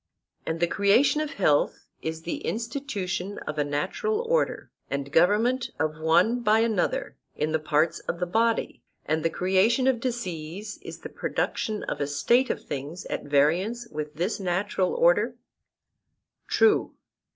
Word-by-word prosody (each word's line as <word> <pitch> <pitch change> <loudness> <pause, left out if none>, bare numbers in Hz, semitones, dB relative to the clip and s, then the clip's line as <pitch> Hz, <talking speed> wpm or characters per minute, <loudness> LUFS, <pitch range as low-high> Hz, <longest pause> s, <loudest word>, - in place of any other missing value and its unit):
And 160 0 -2
the 175 - +4
creation 205 - +3
of 305 -1 -3
health 150 -7 +1 0.2
is 160 0 -4
the 170 - -3
institution 210 -6 -3
of 155 0 -4
a - - +3
natural 185 - -1
order 485 +1 0 0.2
and 140 0 -3
government 215 - +3
of 155 0 -1
one 175 +10 +3
by 220 -1 +4
another 365 - 0 0.2
in 150 +1 -1
the 160 - +1
parts 155 +1 +1
of 170 - -4
the 180 - 0
body; 225 +5 0 0.2
and 155 +1 0
the 165 - +2
creation 190 +9 +2
of 260 -3 +3
disease 205 -5 -4
is - - -9
the - - -7
production 215 -1 -2
of - - -4
a 140 - 0
state 240 - +2
of - - -2
things 145 +5 -5
at - - -3
variance 175 +12 +1
with 150 0 -5
this 180 +8 -1
natural 185 0 0
order? - - +3 1.1
True. 435 -2 +3
185 Hz, 150 wpm, -26 LUFS, 160-235 Hz, 1.1 s, the